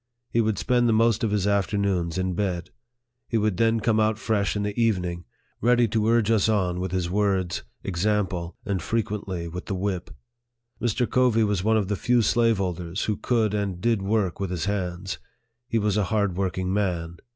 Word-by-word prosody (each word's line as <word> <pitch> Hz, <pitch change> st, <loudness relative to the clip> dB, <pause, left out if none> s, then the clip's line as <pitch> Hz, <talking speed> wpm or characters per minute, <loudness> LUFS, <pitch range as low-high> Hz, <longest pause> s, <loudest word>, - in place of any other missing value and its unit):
He 115 Hz, -, +3 dB
would 110 Hz, -3 st, 0 dB
spend 120 Hz, +6 st, +2 dB
the -, -, +4 dB
most 115 Hz, 0 st, +3 dB
of 110 Hz, -, +2 dB
his 100 Hz, -2 st, 0 dB
afternoons 100 Hz, -4 st, 0 dB
in 95 Hz, 0 st, 0 dB
bed. 90 Hz, -2 st, -2 dB, 0.6 s
He 115 Hz, -, +1 dB
would 105 Hz, -4 st, +1 dB
then 115 Hz, +1 st, +3 dB
come 110 Hz, 0 st, +2 dB
out 110 Hz, 0 st, +2 dB
fresh 110 Hz, -3 st, 0 dB
in 105 Hz, -, -1 dB
the 105 Hz, 0 st, -3 dB
evening, 90 Hz, -7 st, 0 dB, 0.4 s
ready 120 Hz, +1 st, +4 dB
to 110 Hz, 0 st, +1 dB
urge 115 Hz, -1 st, +3 dB
us 110 Hz, -1 st, +3 dB
on 90 Hz, -5 st, +1 dB
with 95 Hz, -1 st, -3 dB
his 90 Hz, -2 st, -1 dB
words, 95 Hz, -2 st, 0 dB, 0.2 s
ex 90 Hz, -2 st, -2 dB
ample, 95 Hz, -5 st, -1 dB
and 95 Hz, -3 st, -1 dB
frequently 100 Hz, -5 st, -2 dB
with 90 Hz, +3 st, -7 dB
the 100 Hz, -, -2 dB
whip. 95 Hz, -1 st, -2 dB, 0.7 s
Mr. 120 Hz, +1 st, +1 dB
Covey 125 Hz, -3 st, +3 dB
was 105 Hz, -3 st, 0 dB
one 110 Hz, +1 st, +3 dB
of 100 Hz, -3 st, 0 dB
the 105 Hz, -, 0 dB
few 120 Hz, +4 st, +2 dB
slaveholders 95 Hz, -7 st, +1 dB
who 105 Hz, -, 0 dB
could 110 Hz, -2 st, +1 dB
and 100 Hz, -4 st, -2 dB
did 115 Hz, 0 st, +1 dB
work 100 Hz, -2 st, 0 dB
with 100 Hz, -2 st, -2 dB
his 90 Hz, -3 st, -2 dB
hands. 95 Hz, -2 st, -3 dB, 0.5 s
He 115 Hz, -, 0 dB
was 105 Hz, -1 st, +1 dB
a 105 Hz, -, +2 dB
hard 100 Hz, -3 st, 0 dB
working 95 Hz, 0 st, -1 dB
man. 85 Hz, -4 st, -1 dB
100 Hz, 195 wpm, -25 LUFS, 90-110 Hz, 0.7 s, the